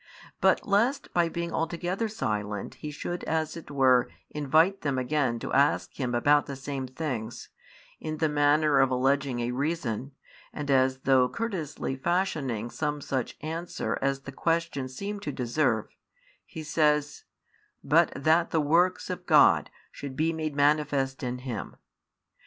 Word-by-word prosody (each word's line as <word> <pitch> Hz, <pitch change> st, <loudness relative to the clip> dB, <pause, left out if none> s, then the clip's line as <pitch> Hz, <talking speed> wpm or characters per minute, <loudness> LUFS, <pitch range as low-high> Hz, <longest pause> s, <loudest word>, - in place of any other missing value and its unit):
But -, -, +3 dB
lest 230 Hz, +8 st, +1 dB
by 170 Hz, -1 st, +2 dB
being 170 Hz, 0 st, -4 dB
altogether 175 Hz, +6 st, -1 dB
silent 105 Hz, -, -3 dB
He 150 Hz, -, -7 dB
should 175 Hz, +4 st, -5 dB
as 160 Hz, -1 st, -1 dB
it 165 Hz, -, -9 dB
were 130 Hz, -3 st, +4 dB, 0.2 s
invite 155 Hz, +7 st, +2 dB
them 140 Hz, -3 st, -1 dB
again 130 Hz, -2 st, 0 dB
to -, -, -5 dB
ask 140 Hz, +1 st, +2 dB
Him 125 Hz, -3 st, -2 dB
about 145 Hz, +4 st, +3 dB
the 140 Hz, -, -5 dB
same 135 Hz, -1 st, -5 dB
things, 125 Hz, -5 st, -5 dB, 0.5 s
in 155 Hz, 0 st, -4 dB
the 160 Hz, -, +2 dB
manner 145 Hz, 0 st, +3 dB
of 135 Hz, -1 st, +4 dB
alleging 130 Hz, 0 st, +1 dB
a 120 Hz, +1 st, -1 dB
reason, 135 Hz, -2 st, -2 dB, 0.4 s
and 145 Hz, -2 st, -3 dB
as 130 Hz, 0 st, +3 dB
though 130 Hz, -2 st, +4 dB
courteously 180 Hz, -12 st, -3 dB
fashioning 140 Hz, -, -1 dB
|15 -, -, -14 dB
some 150 Hz, -1 st, -2 dB
such 130 Hz, -3 st, -3 dB
answer 165 Hz, +3 st, -3 dB
as 135 Hz, 0 st, 0 dB
the 135 Hz, -, -8 dB
questions 165 Hz, -4 st, -1 dB
seemed 200 Hz, +3 st, -5 dB
to 150 Hz, -, -3 dB
deserve, 120 Hz, -3 st, -1 dB, 0.5 s
He 160 Hz, -, -7 dB
says, 150 Hz, -1 st, +1 dB, 0.6 s
But -, -, +4 dB
that 160 Hz, +4 st, +3 dB
the 160 Hz, -, +1 dB
works 170 Hz, +5 st, +2 dB
of -, -, -6 dB
God -, -, +5 dB, 0.2 s
should 140 Hz, -2 st, -7 dB
be 160 Hz, +3 st, +1 dB
made 155 Hz, -2 st, -3 dB
manifest 145 Hz, -2 st, +1 dB
in 125 Hz, -1 st, -3 dB
him. 115 Hz, -6 st, -5 dB
145 Hz, 150 wpm, -28 LUFS, 130-160 Hz, 0.6 s, God